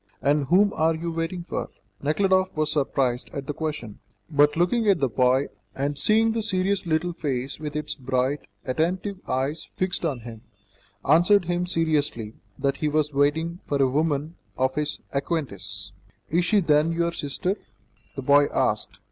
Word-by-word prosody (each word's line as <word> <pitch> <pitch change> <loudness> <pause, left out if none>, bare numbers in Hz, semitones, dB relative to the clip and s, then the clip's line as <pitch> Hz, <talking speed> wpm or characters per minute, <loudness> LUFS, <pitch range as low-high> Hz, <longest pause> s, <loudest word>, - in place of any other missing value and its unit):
"And 145 0 +2
whom 200 +8 +4
are 160 +1 +2
you 165 +1 -3
waiting 165 +2 -3
for?" - - -4 0.3
Nekhludoff 185 +5 +2
was 155 0 +1
surprised 135 -4 0
at 140 -1 -4
the 150 - -3
question, 150 -9 -5 0.3
but 145 +1 +4
looking 210 +6 +2
at 190 -4 +4
the 135 - +2
boy, 130 +2 +2 0.3
and 140 +2 -1
seeing 220 +9 +3
the 225 0 -1
serious 190 -2 0
little 170 +2 0
face 135 -4 -3
with 150 -1 -5
its 150 0 -1
bright, 130 +1 0 0.3
attentive 180 +8 -1
eyes 135 +5 -1
fixed 185 -1 -1
on 140 -7 -1
him, 115 -1 -9 0.7
answered 175 +6 +5
him 175 +1 -1
seriously 150 -10 0 0.2
that 140 0 0
he 155 - -1
was 150 0 +1
waiting 160 +5 +1
for 140 - 0
a 135 - +5
woman 150 +3 0 0.2
of 130 0 +1
his 150 +1 -2
acquaintance. 100 - -3 0.4
"Is 170 +3 +2
she, 210 +1 +3
then, 155 -1 +3
your 170 0 0
sister?" 170 +5 -2 0.6
the 135 - -5
boy 145 +2 +5
asked. - - -1
150 Hz, 165 wpm, -25 LUFS, 140-175 Hz, 0.7 s, answered